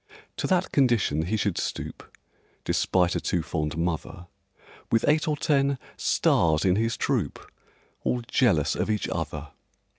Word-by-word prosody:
To - - -1
that 185 -1 +1
condition 115 - +2
he 110 - 0
should 100 -4 -1
stoop - - -6 0.5
(Despite 90 -2 +1
a - - -1
too 85 -2 -1
fond 75 -1 -3
mother), 90 +2 -3 0.7
With 115 0 +3
eight 155 +2 +3
or 150 -1 0
ten 140 -2 +2 0.2
"stars" 80 -1 +2
in 90 -1 +4
his 115 +2 0
troupe, - - -1 0.7
All 125 - 0
jealous 85 - +2
of - - -2
each 105 -1 0
other! - - -4
105 Hz, 145 wpm, -26 LUFS, 85-135 Hz, 0.7 s, in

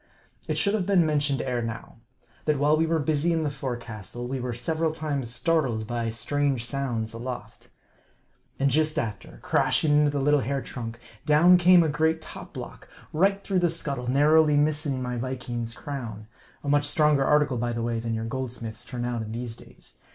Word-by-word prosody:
It - - -1
should 200 - +2
have 200 -4 0
been 190 -4 +4
mentioned 145 -3 +1
ere 125 -2 -1
now, 115 0 -6 0.5
that 150 -2 +2
while 145 +2 +3
we 160 +1 +1
were 165 0 +2
busy 155 +2 +1
in 165 -1 +1
the 145 - -1
forecastle, 120 -4 -6
we 130 +1 -3
were 125 0 -3
several 155 +7 -1
times 145 -6 -3
startled 120 -3 0
by 115 0 -2
strange 130 +2 -1
sounds 120 -5 -3
aloft. 120 +2 -7 0.9
And 140 0 +2
just 155 +2 +2
after, 105 -4 -4
crashing 155 - +2
into 150 -1 +4
the 145 0 -1
little 145 +2 +3
hair 135 +3 -1
trunk, 120 -3 -6 0.3
down 160 +4 +6
came 175 0 +6
a - - +1
great 160 +2 +1
top 160 - -10
block, - - -9 0.2
right 195 +5 +2
through 190 -2 +1
the 175 -1 +2
scuttle, 140 -6 -3
narrowly 150 +3 +4
missing 145 -3 +1
my 125 -1 -3
Viking's 120 -2 -4
crown; 115 -7 -6 0.4
a - - -7
much 145 0 +3
stronger 150 -2 +3
article, 150 -3 +2
by 120 0 -1
the 115 0 -3
way, 115 -1 -1
than 115 0 -2
your 110 0 -3
goldsmiths 115 -2 -5
turn 120 -2 -5
out 120 -1 -2
in 110 -1 -6
these 120 -1 -4
days. - - -15
140 Hz, 190 wpm, -26 LUFS, 120-155 Hz, 0.9 s, down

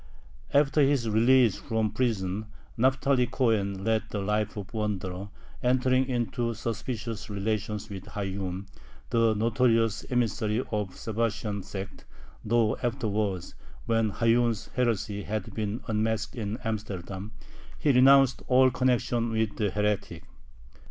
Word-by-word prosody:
After 145 +1 +4
his 135 -4 +3
release 115 0 +4
from 110 -2 -1
prison 105 -3 -1 0.3
Naphtali 130 +1 +2
Cohen 100 -7 0
led 110 0 +2
the - - -4
life 105 +1 -1
of 100 +1 -7
a - - -4
wanderer, 100 -2 -3 0.3
entering 130 +1 +2
into 120 -1 -1
suspicious 115 -1 -4
relations 105 0 -2
with 95 -2 -8
Hayyun, 95 -2 -4 0.5
the 115 -2 +3
notorious 115 0 +2
emissary 115 -2 0
of 105 -3 -1
the - - -16
Sabbatian 105 -2 -2
sect, 100 +1 -7 0.4
though 110 0 +2
afterwards, 105 -6 -2 0.3
when 115 -1 +2
Hayyun's 115 0 +1
heresy 110 -4 0
had 105 0 -4
been 110 +1 -3
unmasked 110 0 -1
in 110 -2 -3
Amsterdam, 100 -2 -5 0.4
he 150 - +2
renounced 135 0 +6
all 130 0 +5
connection 120 -2 +1
with 110 -2 0
the 105 -2 +1
heretic. 105 0 -1
110 Hz, 125 wpm, -28 LUFS, 105-120 Hz, 0.5 s, renounced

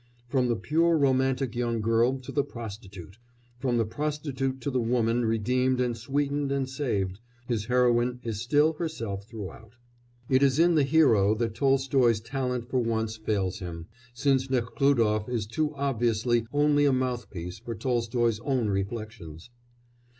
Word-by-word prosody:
From 130 0 +2
the 120 - +1
pure 165 +7 +2
romantic 130 -3 +1
young 120 -1 -1
girl 115 +4 +2
to 125 - -8
the 145 - +1
prostitute, 100 - -9 0.4
from 125 -2 0
the 115 - +2
prostitute 135 0 -3
to 140 - -2
the 125 -1 0
woman 115 0 +1
redeemed 125 +4 +1
and 125 -2 0
sweetened 140 +4 -1
and 135 -1 0
saved 110 -9 -2 0.3
his 115 -4 -1
heroine 125 0 +2
is 110 -3 -4
still 145 +6 +3
herself 115 - -5
throughout. 110 +1 -9 0.5
It 130 0 +3
is 135 -1 +3
in 170 +2 +5
the 155 - +4
hero 130 -9 +4
that 115 0 -2
Tolstoy's 135 -3 +2
talent 125 0 -3
for 130 0 0
once 110 -2 -1
fails 100 -4 -2
him, 85 -3 -7 0.3
since 130 +1 +1
Nekhlúdof 120 -3 +1
is 115 -4 -1
too 150 +7 -2
obviously 120 -3 0
only 145 0 +3
a 140 - +4
mouthpiece 120 -9 -3
for 115 +1 -6
Tolstoy's 120 -1 0
own 125 -3 0
reflections. 100 -3 -5
120 Hz, 150 wpm, -27 LUFS, 110-135 Hz, 0.5 s, in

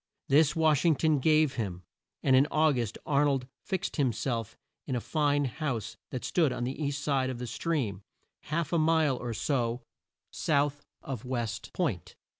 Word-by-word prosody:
This 150 +2 +5
Wash 155 -3 +3
ing 165 -3 +4
ton 155 0 +2
gave 155 -1 +3
him, 95 -6 -3 0.4
and 135 -2 +5
in 135 +3 +5
Au 155 0 +4
gust 120 -5 -2
Ar 145 -1 +3
nold 135 -3 +1 0.2
fixed 190 -2 -3
him 135 -5 +3
self 115 0 -3 0.3
in 130 - -1
a - - +1
fine 145 +1 +1
house 130 -4 -3
that 125 - -5
stood 160 -6 +2
on 120 - -3
the 135 +5 -3
east 140 0 -2
side 135 -3 +1
of 130 - -4
the 125 - -5
stream, 120 - -2 0.4
half 160 +1 -2
a 170 - +3
mile 155 -4 +3
or 120 -2 -4
so 120 -3 -1 0.5
south 145 -1 0 0.2
of 130 -6 -5
West 120 -4 -3
Point. 130 - -2
140 Hz, 180 wpm, -29 LUFS, 120-155 Hz, 0.5 s, This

